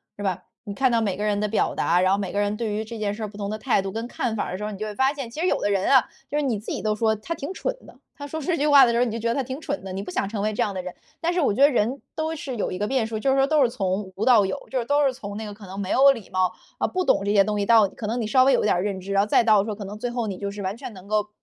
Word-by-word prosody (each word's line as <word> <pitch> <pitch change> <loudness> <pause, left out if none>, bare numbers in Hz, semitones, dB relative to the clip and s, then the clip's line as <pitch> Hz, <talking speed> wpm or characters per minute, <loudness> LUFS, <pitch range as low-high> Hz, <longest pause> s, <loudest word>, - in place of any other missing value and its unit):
是 - - -9
吧？ 190 -3 -2 0.2
你 205 - -5
看 260 +4 +2
到 230 - +3
每 205 -4 0
个 205 - -4
人 210 -1 +1
的 210 - 0
表 210 +1 0
达， 175 +2 +2
然 185 0 +3
后 200 - +2
每 195 -3 -4
个 205 - 0
人 205 +1 -1
对 220 -2 -2
于 215 +1 -2
这 225 +1 -8
件 210 -2 -1
事 220 +1 -6
儿 - - -2
不 200 - -13
同 200 -1 -3
的 215 - -3
态 225 -2 +1
度 195 - -4
跟 225 +4 -4
看 240 -1 -3
法 210 - -1
儿 - - -5
的 185 - -3
时 210 - -4
候， 210 - -4
你 200 - -7
就 215 - -4
会 210 - -5
发 265 +5 +2
现， 275 -5 -6
其 300 - -8
实 350 - +1
有 - - +1
的 205 - +1
人 195 -1 +1
啊， 265 -3 +5 0.2
就 295 - -1
是 - - +2
你 250 -7 -1
自 210 - -5
己 - - -4
都 215 -1 +1
说 220 0 +1
他 215 +11 -5
挺 295 +2 -6
蠢 - - -2
的， - - -15 0.2
他 285 -1 -7
说 315 +2 -5
这 335 +3 0
句 295 - +1
话 285 -2 +8
的 235 - +2
时 235 - +1
候 245 - +4
你 235 - -2
就 225 - -3
觉 230 +1 -1
得 - - +1
他 275 - +1
挺 260 +3 -6
蠢 290 -1 -3
的， 190 -1 -7
你 195 +1 -4
不 180 - -7
想 195 - -1
成 205 0 -4
为 215 +1 0
这 210 - -2
样 205 - 0
的 185 - -3
人。 180 0 -7 0.3
但 340 +1 0
是 360 - 0
我 275 -10 +2
觉 255 - -1
得 285 +1 +7
人 245 +2 0
都 315 +1 -2
是 270 -5 -5
有 - - -1
一 180 - -4
个 205 - -1
变 255 -1 0
数， 225 -1 -4
就 265 +5 +1
是 270 - +2
说 270 0 +4
都 305 0 +3
是 255 - +4
从 195 -4 -2
无 210 - -1
到 235 -6 +6
有， 190 - -2
就 265 - -2
是 245 - 0
都 285 +2 +3
是 265 - +2
从 205 -5 -7
那 220 - -5
个 205 - -7
可 205 0 -13
能 190 +2 -7
没 190 -2 -4
有 275 +1 +7
礼 230 -7 -6
貌， 185 -1 +1 0.3
啊， - - +1
不 370 0 -2
懂 - - +3
这 200 - 0
些 200 -2 +5
东 210 -1 -1
西 200 - 0
到 225 -2 +6
可 215 - -8
能 235 +3 -1
你 225 - -2
稍 255 +4 +5
微 270 - +5
有 - - +3
点 210 - +3
儿 175 - 0
认 200 -2 -2
知， 195 +2 -5
然 200 0 +4
后 - - -3
再 230 - +3
到 215 -3 +5
说 215 0 -3
可 205 0 -7
能 205 +2 -7
最 245 +3 -3
后 240 -2 -2
你 195 -3 -4
就 200 +1 -4
是 205 0 -7
完 190 +1 -3
全 235 - -8
能 190 0 -13
够 210 0 0
215 Hz, 420 characters per minute, -24 LUFS, 200-260 Hz, 0.3 s, 话